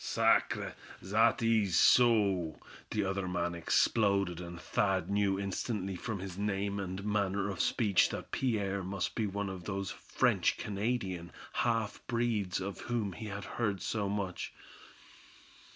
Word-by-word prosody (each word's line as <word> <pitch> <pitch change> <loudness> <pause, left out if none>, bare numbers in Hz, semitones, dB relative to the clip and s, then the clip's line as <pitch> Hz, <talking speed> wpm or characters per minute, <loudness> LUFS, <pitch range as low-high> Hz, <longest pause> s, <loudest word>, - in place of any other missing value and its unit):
"Sacre! - - +2 0.3
zat 110 +5 +3
ees 110 -6 +3
so," 100 -9 +4 0.3
the 105 -2 0
other 95 -1 -1
man 85 -1 -1
exploded, 100 +1 +2
and 85 0 -7
Thad 95 +2 0
knew 100 -1 +2
instantly 100 0 -2
from 110 +4 -4
his 95 0 -7
name 100 0 -1
and 95 +1 -4
manner 100 -1 0
of 95 - -2
speech 105 -6 +3
that - - -6
Pierre 100 -6 0
must 95 0 -2
be 110 -2 0
one 100 +1 -3
of 95 -2 -6
those 100 -2 -3
French - - +1
Canadian 100 -5 -2 0.2
half 115 -3 0
breeds 115 -6 0
of 95 +1 -5
whom 115 -5 -2
he 110 +5 -7
had 100 0 -5
heard 105 -5 -1
so 105 0 -1
much. 100 -2 -3
100 Hz, 140 wpm, -32 LUFS, 95-105 Hz, 0.3 s, so